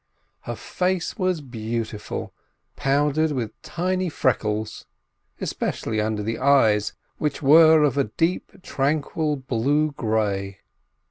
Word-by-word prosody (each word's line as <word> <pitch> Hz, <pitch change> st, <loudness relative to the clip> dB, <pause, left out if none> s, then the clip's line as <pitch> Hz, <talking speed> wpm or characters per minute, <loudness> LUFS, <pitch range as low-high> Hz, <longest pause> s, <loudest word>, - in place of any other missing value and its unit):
Her -, -, -2 dB
face 185 Hz, +1 st, -2 dB
was 185 Hz, -4 st, 0 dB
beautiful, 115 Hz, -4 st, -5 dB, 0.4 s
powdered 145 Hz, +3 st, +1 dB
with 115 Hz, -5 st, -4 dB
tiny 185 Hz, +1 st, -1 dB
freckles; 110 Hz, -7 st, -1 dB, 0.5 s
especially 110 Hz, -1 st, -2 dB
under 105 Hz, -1 st, -1 dB
the 115 Hz, +2 st, -3 dB
eyes, 115 Hz, -7 st, +3 dB, 0.3 s
which 150 Hz, 0 st, -2 dB
were 160 Hz, +2 st, +7 dB
of 145 Hz, -1 st, +2 dB
a 140 Hz, -, +3 dB
deep, 175 Hz, -, -2 dB
tranquil 150 Hz, +2 st, 0 dB
blue 140 Hz, +4 st, 0 dB
grey. 105 Hz, -6 st, -2 dB
140 Hz, 110 wpm, -24 LUFS, 110-155 Hz, 0.5 s, were